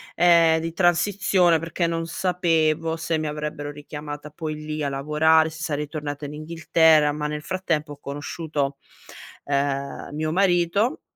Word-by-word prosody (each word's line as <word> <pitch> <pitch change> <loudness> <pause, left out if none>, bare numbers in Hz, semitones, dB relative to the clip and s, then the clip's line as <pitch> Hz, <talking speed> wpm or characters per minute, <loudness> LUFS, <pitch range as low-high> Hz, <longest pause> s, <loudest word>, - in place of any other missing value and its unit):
ehm, 170 -2 +5
di 165 +1 -3
transizione 180 -1 +3
perché 165 +2 -2
non 165 0 -1
sapevo 165 -2 0
se 165 0 -1
mi 155 0 -2
avrebbero 150 -1 -4
richiamata 145 0 -8
poi 155 0 -5
lì 155 0 -5
a 140 - 0
lavorare, 155 +3 +3
se 160 0 -8
sarei 150 -2 -2
tornata 145 -1 -5
in 145 - -7
Inghilterra 160 -1 +3
ma 150 0 -3
nel 150 0 -4
frattempo 165 -4 -2
ho - - -13
conosciuto, 145 0 -4 0.7
ehm, 140 0 -2
mio 155 +1 -2
marito 190 - +2
155 Hz, 145 wpm, -24 LUFS, 150-165 Hz, 0.7 s, ehm